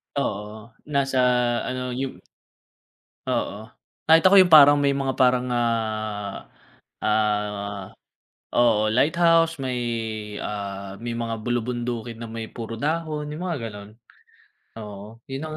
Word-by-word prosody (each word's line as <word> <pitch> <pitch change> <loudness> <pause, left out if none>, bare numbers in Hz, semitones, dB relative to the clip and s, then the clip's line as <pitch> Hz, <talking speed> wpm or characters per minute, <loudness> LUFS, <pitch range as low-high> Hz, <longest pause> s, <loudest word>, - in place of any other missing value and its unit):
Oo, 105 -4 -4 0.2
nasa 140 -3 0 0.5
ano 125 0 -3
yung 130 +1 -4 1.1
Oo. - - -1 0.5
Kahit 160 +1 +6
ako 195 - +6
yung 180 -2 +2
parang 145 -1 +9
may 140 - +3
mga 135 -1 -1
parang, 125 -1 +4
ah, 110 -4 -2 0.5
ah, 105 -2 -1 0.7
oo, 110 -3 +4
lighthouse 165 +3 +3
may 130 -2 -2 0.6
ah, 100 -1 -5
may 120 - -3
mga 115 -1 -3
bulubundukin 120 -1 -3
na 115 - -8
may 110 0 -6
puro 115 -1 -7
dahon 155 0 -2
yung 150 +3 -6
mga 170 -5 -2
ganun. 105 -1 -10 0.9
Oo, 105 +1 -10
yun 135 +3 -5
ang 155 0 -6
120 Hz, 120 wpm, -24 LUFS, 110-140 Hz, 1.1 s, parang